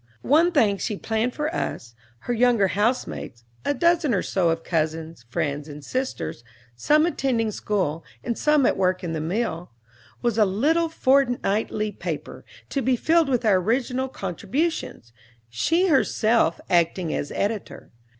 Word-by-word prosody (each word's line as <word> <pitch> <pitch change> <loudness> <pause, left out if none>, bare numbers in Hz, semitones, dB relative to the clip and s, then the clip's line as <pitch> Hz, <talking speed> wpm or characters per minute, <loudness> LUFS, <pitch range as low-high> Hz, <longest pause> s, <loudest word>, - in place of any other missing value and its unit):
One 325 +5 +4
thing 215 - +2
she 210 - -2
planned 225 +4 -1
for 300 +2 -2
us, 115 - -4 0.3
her 245 - -2
younger 235 -4 +3
housemates, 205 - -2 0.2
a 285 - 0
dozen 335 -4 +2
or 185 - 0
so 180 -3 +1
of 165 0 -1
cousins, 160 -4 -2
friends, 145 +1 -2
and 145 -1 -9
sisters, 255 - -3 0.3
some 300 - +3
attending 250 -9 0
school, 180 -7 -2 0.2
and 235 - -2
some 300 0 +3
at - - +2
work 185 -1 +1
in 165 -2 -3
the 160 - -2
mill, 175 0 -2 0.5
was 235 -2 +1
a - - +7
little 295 - +1
fortnightly 245 -7 +1
paper, - - -6 0.3
to 275 - -1
be 260 +1 +2
filled 320 +4 +2
with 245 -3 0
our 205 -3 +5
original 250 +6 0
contributions, 195 - -3 0.4
she 330 - +2
herself 230 - +2
acting 170 0 +1
as 145 - -3
editor. 205 0 -3
220 Hz, 150 wpm, -24 LUFS, 175-270 Hz, 0.5 s, a